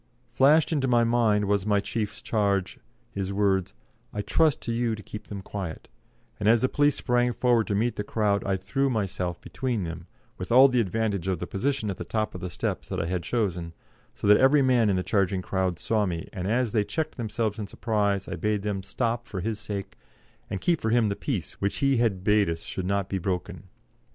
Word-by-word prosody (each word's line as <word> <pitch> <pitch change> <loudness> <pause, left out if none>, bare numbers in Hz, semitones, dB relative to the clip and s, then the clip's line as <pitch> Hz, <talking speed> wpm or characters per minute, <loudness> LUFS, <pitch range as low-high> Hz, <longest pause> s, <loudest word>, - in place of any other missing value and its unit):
Flashed 150 +4 +4
into 140 -4 +1
my 120 -2 +4
mind 115 -3 +2 0.2
my 105 -1 +3
chief's 110 +2 -4
charge, 100 -5 0 0.3
his 100 -1 -3
words, 100 -2 +1 0.4
"I 105 - -3
trust 155 +6 +2
to 115 - -3
you 115 -1 0
to 105 - -11
keep 105 - -9
them 100 -2 -7
quiet," 95 -5 -6 0.5
and 105 0 +2
as 115 0 +5
the 130 - +2
police 145 -1 +3
sprang 125 -1 +1
forward 120 -3 +2
to 100 - 0
meet 115 +4 0
the 105 - -1
crowd 105 -2 0
I 95 -1 0
threw 120 +9 0
myself 95 -6 -2
between 125 -6 -2
them, 85 +1 -6 0.3
with 95 +5 -5
all 130 +3 +8
the 125 -1 +2
advantage 105 -2 -1
of 95 -2 0
the - - -4
position 110 0 -1
of 95 - -6
the - - -5
top 110 -1 -2
of 90 - -7
the 90 - -4
steps - - -3
that - - -2
I - - -1
had 90 +1 -1
chosen, 85 -5 -2 0.4
so - - -6
that 105 0 +7
every 135 +2 +5
man 125 -4 +3
in 100 - +2
the 90 - 0
charging 95 -2 0
crowd 95 -3 -1
saw 105 +2 0
me, 85 -2 -4
and 90 0 -4
as 120 +1 +1
they 110 -3 +2
checked 160 +8 -3
themselves 110 -2 -2
in 105 - -4
surprise 100 -2 -1
I - - -4
bade 105 -2 -1
them 105 -2 -2
stop 115 +4 -2
for 95 - -5
his 110 +2 -3
sake, 100 -3 -6 0.5
and 95 - -3
keep 170 - +1
for 110 - 0
him 115 -2 +3
the 100 - -1
peace 105 - -4
which 100 0 0
he 135 -2 +2
had 105 -6 +1
bade 105 -2 +3
us 80 0 -4
should 90 -1 -4
not 100 -1 0
be 95 - -2
broken. 90 0 -3
105 Hz, 220 wpm, -26 LUFS, 95-120 Hz, 0.5 s, all